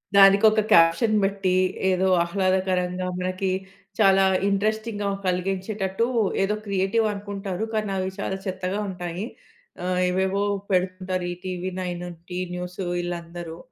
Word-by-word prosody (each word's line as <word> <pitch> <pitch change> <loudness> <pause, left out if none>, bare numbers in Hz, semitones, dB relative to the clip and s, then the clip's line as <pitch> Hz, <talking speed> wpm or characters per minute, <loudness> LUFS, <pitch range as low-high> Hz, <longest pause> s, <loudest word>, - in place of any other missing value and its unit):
దానికి 195 +2 +7
ఒక 215 0 +1
క్యాప్షన్ 170 +7 +5
పెట్టి 195 -2 +1 0.3
ఏదో 185 0 +2 0.2
ఆహ్లాదకరంగా 185 0 0
మనకి 185 +1 -1 0.5
చాలా 195 -2 +6 0.3
ఇంట్రెస్టింగ్‌గా 215 +1 -1 0.2
కలిగించేటట్టు, 190 +3 -1 0.4
ఏదో 210 +2 +1
క్రియేటివ్ 200 +3 +1
అనుకుంటారు, 200 -1 -4
కానీ 215 -2 -1
అవి 190 0 -1
చాలా 190 -1 -2
చెత్తగా 185 +1 -2
ఉంటాయి. 180 +1 -4 0.6
ఆహ్, 180 0 0
ఏవేవో 190 +2 +1 0.3
పెడుతుంటారు 185 0 0
ఈ - - -2
'టీవీ 185 0 -3
నైన్' 175 -1 -4 0.2
'టి 180 0 -3 0.2
న్యూస్' 180 +1 -6
వీళ్ళందరూ. 175 -1 -5
190 Hz, 120 wpm, -24 LUFS, 180-200 Hz, 0.6 s, దానికి